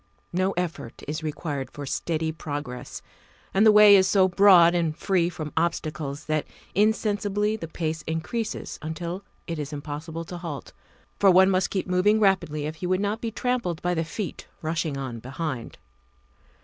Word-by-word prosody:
No 185 +2 +1
effort 170 -9 -4
is 155 +2 -3
required 150 -3 -4
for 145 - -7
steady 160 +3 -1
progress, 145 -5 -6 0.5
and 205 +3 +5
the - - +9
way 210 -1 +9
is 190 -1 +5
so 195 -1 +4
broad 180 -2 +7
and 165 -3 0
free 175 -3 +1
from 155 -4 -6
obstacles 155 -3 -2
that 155 -1 -1 0.3
insensibly 210 0 +1
the 170 -7 -6
pace 160 -1 -3
increases 165 +8 -3
until 170 +4 -5 0.2
it 165 -3 -4
is 145 0 -4
impossible 155 +3 -5
to 175 +1 -7
halt, 165 -5 -7 0.5
for 200 - +6
one 190 +1 +6
must 185 0 +2
keep 190 - -2
moving 185 +4 +3
rapidly 185 -7 +2
if 155 +1 -5
he 180 - -4
would 185 +1 +1
not 205 +2 -1
be 230 - -2
trampled 230 -7 -1
by 180 0 +1
the 165 -1 0
feet 170 +4 -6 0.2
rushing 160 -2 -1
on 130 -4 -5
behind. 130 0 -5
170 Hz, 165 wpm, -25 LUFS, 155-195 Hz, 0.5 s, the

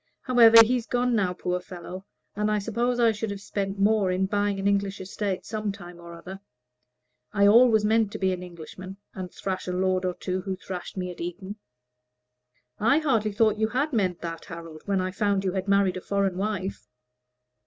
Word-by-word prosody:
However, 230 -3 +8
he's 245 0 -1
gone 245 0 +1
now, 190 -4 +1
poor 180 0 -2
fellow; 180 +1 -9 0.3
and 210 +1 0
I 210 - +2
suppose 235 +4 -1
I 230 -1 +5
should 220 0 -4
have 200 -1 -5
spent 200 0 -3
more 205 -1 +3
in 185 +1 +1
buying 205 0 0
an 195 - 0
English 200 0 0
estate 195 0 -3
some 215 -2 -3
time 175 -2 -11
or 170 0 -10
other. 190 +3 -9 0.9
I 200 -1 +4
always 220 0 +6
meant 220 -1 +2
to - - -3
be 190 -1 +1
an 180 - -5
Englishman, 180 +2 -9 0.2
and 185 -2 -6
thrash 190 -1 -4
a - - -1
lord 185 0 0
or 180 -1 -1
two 185 0 -3
who 190 0 -3
thrashed 185 0 -7
me 180 -1 -3
at 175 - -10
Eton." 185 +4 -6 1.2
"I 225 +7 +4
hardly 230 -9 +1
thought 215 0 +2
you 220 - +2
could 245 - -5
have 290 +2 0
meant 185 -6 0
that, 165 -1 -6
Harold, 165 -2 -9
when 195 -2 +1
I 185 0 -2
found 200 0 0
you 190 - 0
had 190 +1 -3
married 200 -2 +3
a - - -6
foreign 200 -1 0
wife." 195 0 -3
195 Hz, 200 wpm, -26 LUFS, 185-215 Hz, 1.2 s, However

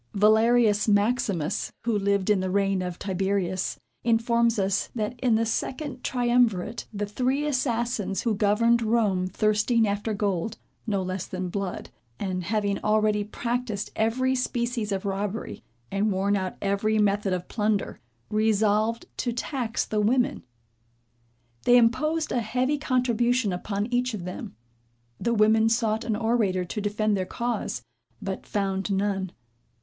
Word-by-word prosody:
Valerius 220 +1 +4
Maximus 205 -4 +1
who 230 -2 0
lived 200 0 +1
in 205 - +3
the 185 0 -1
reign 195 0 +1
of 180 -1 -4
Tiberius, 190 -1 -1 0.2
informs 235 0 +2
us 195 -1 0
that, 215 0 -1
in 245 -3 +3
the 225 +1 +2
second 255 +3 -3
triumvirate, 240 -4 +1
the 205 -1 -2
three 255 +7 0
assassins 235 -8 -1
who 230 - +1
governed 225 +3 +3
Rome 215 -5 +1
thirsting 215 +4 +2
after 205 +2 -1
gold, 200 +1 -1 0.3
no 200 -3 0
less 185 0 -4
than 185 -1 -4
blood, 195 0 -4 0.3
and 185 -3 -3
having 205 0 0
already 210 -1 +2
practised 235 0 -3
every 250 +4 +1
species 240 -3 -1
of 195 0 -2
robbery, 200 +2 -3 0.3
and 200 +2 +1
worn 195 +2 +1
out 185 -2 -3
every 200 +2 +1
method 205 -1 +2
of 180 -1 -2
plunder; 210 -2 -1 0.3
resolved 215 +1 +2
to 245 - -1
tax 245 -1 -2
the 215 -1 0
women. 245 +4 +2 1.2
They 245 - +7
imposed 305 +7 +2
a 245 - +1
heavy 255 +6 0
contribution 245 -5 +1
upon 200 +3 -2
each 245 -1 +1
of 180 -4 -6
them. 180 -10 -7 0.6
The 235 0 0
women 220 +1 +4
sought 225 -1 +1
an 220 - -1
orator 210 -5 +1
to 210 +4 -4
defend 210 +1 0
their 185 -2 -2
cause, 235 - -3 0.4
but 190 -1 -5
found 195 -1 -1
none. 195 -2 0
215 Hz, 140 wpm, -26 LUFS, 195-235 Hz, 1.2 s, They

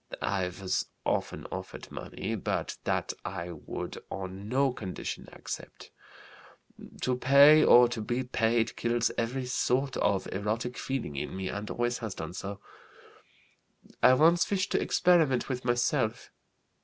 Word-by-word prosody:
I 95 -2 0
was 90 +1 -2 0.2
often - - -1
offered - - -7
money, - - -5
but - - -2
that - - 0
I 90 -1 -5
would - - -6
on 95 +2 -6
no 135 +1 +2
condition 95 -6 -6
accept. - - -8 1.1
To 125 - +1
pay 140 +4 +7
or 120 0 +8
to 115 -2 -4
be 120 +4 -1
paid 115 -2 +1
kills 120 0 +1
every 125 +3 -2
sort 130 +1 0
of 100 -2 +1
erotic 110 +5 -2
feeling 130 - -3
in 70 - -4
me 95 -1 -3
and 105 +1 -5
always 120 +1 -1
has 110 -5 -5
done 80 +1 -6
so. 100 +2 -6 1.4
I 130 - +7
once 170 +5 +4
wished 195 0 0
to - - +2
experiment 160 -9 +3
with 125 -1 -3
myself. 120 -1 0
120 Hz, 140 wpm, -29 LUFS, 100-130 Hz, 1.4 s, or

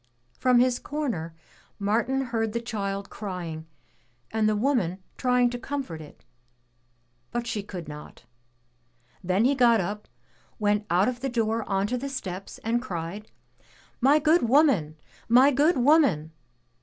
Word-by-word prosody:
From 255 -1 +4
his 250 0 +3
comer, 230 - -4 0.4
Martin 230 +6 0
heard 225 -4 -2
the 235 - 0
child 200 -4 -4
crying 175 -6 -6 0.6
and 220 -1 +2
the 215 - +1
woman 210 -7 +1 0.2
trying 250 -1 +2
to 245 - -5
comfort 260 - -5
it, 150 - -14 1.0
but 240 0 -3
she 225 -3 -2
could 185 -4 -8
not. 150 0 -11 1.0
Then 185 +5 +2
he 270 - +4
got 240 -4 +4
up, 205 +3 -4 0.5
went 210 -1 0
out 180 +4 +3
of 250 -1 -2
the 270 +1 -2
door 225 -2 0
onto 200 +5 0
the 275 +3 -4
steps 195 -8 -6
and 235 +2 0
cried, 190 -1 -6 0.7
"My 275 +4 +5
good 315 +3 +3
woman! 240 - +3 0.3
My 255 +4 +6
good 295 +5 +3
woman! 250 - +3
225 Hz, 140 wpm, -26 LUFS, 195-255 Hz, 1.0 s, My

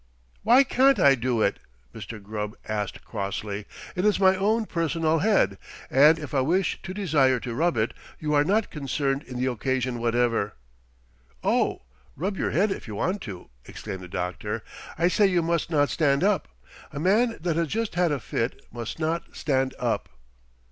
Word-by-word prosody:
"Why 245 +5 +6
can't 270 0 +4
I 140 - +6
do 120 -3 0
it?" 100 - +1 0.3
Mr. 115 - -8
Gubb 105 +1 -5
asked 105 -2 -3
crossly. 100 +1 -4 0.3
"It 180 - -1
is 210 -1 +3
my 190 -1 +5
own 215 +4 +1
personal 165 -2 0
head, 165 - +2 0.3
and 150 +4 +6
if 150 -5 -8
I 135 - +3
wish 175 +8 0
to 185 - -6
desire 145 -10 +2
to 120 - -4
rub 165 +5 +1
it, 110 +1 0 0.3
you 150 -1 -1
are 145 0 +5
not 205 +7 +1
concerned 140 -1 -1
in 125 -4 -8
the 130 - +1
occasion 125 0 -1
whatever." 115 -3 +1 0.9
"Oh, - - +1 0.3
rub 190 +7 -2
your - - -1
head 200 +4 +2
if - - -5
you 105 - -6
want 185 - -1
to!" 90 -9 -9 0.2
exclaimed 95 - -7
the 90 - -8
doctor. 90 -1 -4 0.3
"I 170 +2 +3
say 200 +3 +4
you 180 -3 +2
must 170 0 0
not 145 -3 +2
stand 140 -1 +2
up. 205 0 +2 0.4
A - - -5
man 220 +8 +2
that 165 0 -1
has 165 0 +1
just 225 +5 -2
had 175 -1 +2
a 145 - 0
fit 115 0 -3
must 120 -2 -6
not 165 +1 -2
stand 135 -2 0
up." - - -1
150 Hz, 180 wpm, -26 LUFS, 120-185 Hz, 0.9 s, Why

